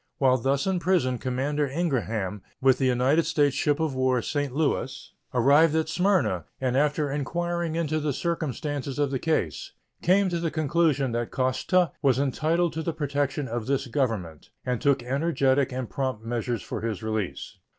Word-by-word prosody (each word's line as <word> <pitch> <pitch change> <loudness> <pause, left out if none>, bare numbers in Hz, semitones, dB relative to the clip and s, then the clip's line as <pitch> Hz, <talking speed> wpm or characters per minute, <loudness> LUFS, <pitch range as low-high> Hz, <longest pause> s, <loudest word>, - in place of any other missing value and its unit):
While 130 -2 +3
thus 135 +3 0
in 190 -2 +1
prison 165 -9 +1
Commander 140 +3 -1
Ingraham, 115 - -2 0.2
with 130 -1 +4
the 135 - +2
United 130 +6 +3
States 145 -4 +2
ship 145 0 +1
of 160 -3 0
war 130 -2 +1
St. 145 -2 -2
Louis, 140 -1 -2 0.2
arrived 145 +6 +4
at 160 0 0
Smyrna, 180 - +1
and 130 -1 0
after 145 +1 +1
inquiring 170 +3 -2
into 155 -2 0
the 150 -1 -1
circumstances 145 -3 -3
of 145 -2 +1
the 135 - -1
case 120 - -1 0.3
came 190 +3 +3
to 170 -1 -1
the 165 -1 -1
conclusion 155 -3 +1
that 120 0 -2
Koszta 130 +8 +1
was 135 -5 +3
entitled 155 +5 +1
to 160 - -3
the 165 0 -2
protection 145 -2 -1
of 115 -1 -4
this 140 0 0
Government, 115 - -2 0.2
and 125 -2 -1
took 140 -4 +2
energetic 135 0 +1
and 130 -1 -3
prompt 130 -5 -3
measures 120 -1 -2
for - - -5
his 110 -2 -3
release. 110 -3 -4
140 Hz, 170 wpm, -26 LUFS, 125-155 Hz, 0.3 s, with